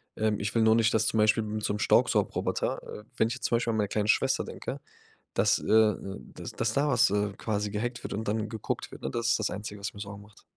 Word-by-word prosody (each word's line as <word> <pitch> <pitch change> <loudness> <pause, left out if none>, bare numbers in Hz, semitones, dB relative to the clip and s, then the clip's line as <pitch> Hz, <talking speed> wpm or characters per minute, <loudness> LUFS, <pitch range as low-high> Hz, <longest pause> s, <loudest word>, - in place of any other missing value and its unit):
ähm, 110 -1 0
ich 100 +2 -3
will 115 - +4
nur 110 0 +5
nicht, 115 +1 +3
dass 110 -1 +2
zum - - 0
Beispiel 110 +1 +4
mit 110 0 -4
so 105 - 0
'nem 105 - -3
Staubsaugroboter - - +1
äh, 105 - -9
wenn 110 - +3
ich 115 - -2
jetzt 130 - -9
zum 120 - +3
Beispiel 115 -1 -1
an 110 - -1
meine 105 -2 0
kleine 105 0 0
Schwester - - +2
denke, - - -6 0.6
dass - - +3
äh, - - -8
äh, 105 -3 +3 0.2
dass - - -7
dass 110 - -1
da 145 +4 +2
was, 125 -3 +4
äh, 105 0 0
quasi 105 -2 -2
gehackt 120 +4 -3
wird - - -5
und 110 +2 -3
dann 105 +1 -1
geguckt 110 -1 -4
wird, - - -11
ne? 65 - -2
Das 115 +7 -1
ist 120 - +3
das 110 - -1
Einzige, 105 0 -6
was 100 - -4
mir 100 - -10
sorgen 100 0 -7
macht. 105 0 -19
110 Hz, 265 wpm, -28 LUFS, 105-115 Hz, 0.6 s, nur